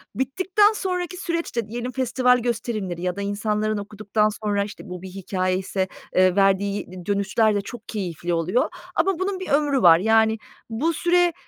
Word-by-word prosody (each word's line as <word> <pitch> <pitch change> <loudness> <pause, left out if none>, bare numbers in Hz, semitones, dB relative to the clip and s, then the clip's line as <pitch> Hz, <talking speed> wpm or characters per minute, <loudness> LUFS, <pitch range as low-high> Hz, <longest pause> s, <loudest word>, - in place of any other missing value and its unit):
Bittikten 375 +10 +2
sonraki 365 -3 -3
süreç 335 -5 -3
de 235 -3 -1
diyelim 240 +3 -4
festival 250 0 +2
gösterimleri 220 -7 -3
ya 180 0 -1
da 200 - -4
insanların 210 +1 -1
okuduktan 210 +1 0
sonra, 205 -1 +1
işte, 205 0 -9
bu 180 -1 -7
bir 190 - -8
hikâyeyse, 185 0 -2 0.3
eee, 185 -1 +4
verdiği 200 0 +2
d 180 -1 -9
dönüşler 205 +2 +2
de 205 - +1
çok 225 +2 -10
keyifli 175 -5 -3
oluyor 175 +9 +1 0.3
ama 365 +1 +1
bunun 380 0 -1
bir 375 - -6
ömrü 285 -2 +2
var. 170 -3 +7
Yani, 220 +1 +3 0.3
bu 280 +10 0
süre, 350 +1 +3
215 Hz, 165 wpm, -23 LUFS, 195-265 Hz, 0.3 s, var